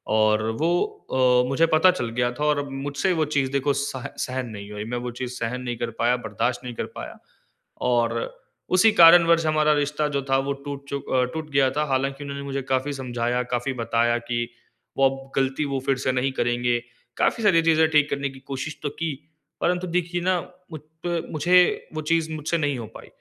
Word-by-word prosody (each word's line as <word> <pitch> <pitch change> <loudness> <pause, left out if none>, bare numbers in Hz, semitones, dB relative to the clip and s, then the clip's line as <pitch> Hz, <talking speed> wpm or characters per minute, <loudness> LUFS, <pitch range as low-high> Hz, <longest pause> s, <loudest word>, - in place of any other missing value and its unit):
और 110 0 +3 0.2
वो 165 - +2 0.7
अ, - - -4
मुझे 150 +5 +3
पता 185 +4 +6
चल 145 -10 -3
गया 120 0 +2
था 150 - -1
और 150 -1 +2
अब 140 -1 -4
मुझसे 140 +7 -1
वो 160 -2 +1
चीज़ 135 -2 +1
देखो 140 +1 +1
सह 135 -2 -3 0.2
सहन 130 -1 -4
नहीं 100 -1 -9
हुई। 105 0 -5
मैं - - -1
वो 120 - -3
चीज़ 125 -1 -3
सहन 125 +2 -3
नहीं 120 -1 -4
कर 120 0 -2
पाया, 120 +1 +3
बर्दाश्त 120 +2 -2
नहीं 125 -1 -6
कर - - -3
पाया। - - -7 0.7
और 115 -1 0 0.4
उसी 220 +4 +6
कारण 170 -3 +8
वर्ष 165 -1 +4
हमारा 155 -1 +3
रिश्ता 150 +1 0
जो 140 - +1
था 135 - +4
वो 140 - 0
टूट 140 -1 -6
चू 140 - -2
अ, 130 -1 0
टूट 160 -1 -5
गया 135 -2 +4
था 150 - +2
हालाँकि 135 +2 -1
उन्होंने 140 0 -6
मुझे 140 0 -3
काफ़ी 130 +2 0
समझाया, 125 -2 -1
काफ़ी 125 +2 -2
बताया 120 +1 +2
कि 120 0 -1 0.5
वो 135 0 +5
अब 135 0 -9
गलती 135 +2 0
वो 135 - 0
फिर 135 - +2
से 130 - +3
नहीं 130 +1 0
करेंगे। 120 -1 +1 0.4
काफ़ी 230 - +1
सारी 175 -5 +5
चीज़ें 160 -1 +4
ठीक 150 -2 +3
करने 140 0 -2
की 135 0 -12
कोशिश 135 +2 -6
तो 145 - -1
की 160 +2 -3 0.5
परंतु 180 +1 0
देखिए 175 0 -1
ना 185 0 +1 0.3
मुझ 155 - -6 0.3
प 170 -1 0
मुझे 180 +4 +3
वो 155 - -2
चीज़ 160 0 0
मुझसे 155 +2 -1
नहीं 145 -3 0
हो 115 - -5
पाई। - - -11
140 Hz, 210 wpm, -24 LUFS, 125-155 Hz, 0.7 s, कारण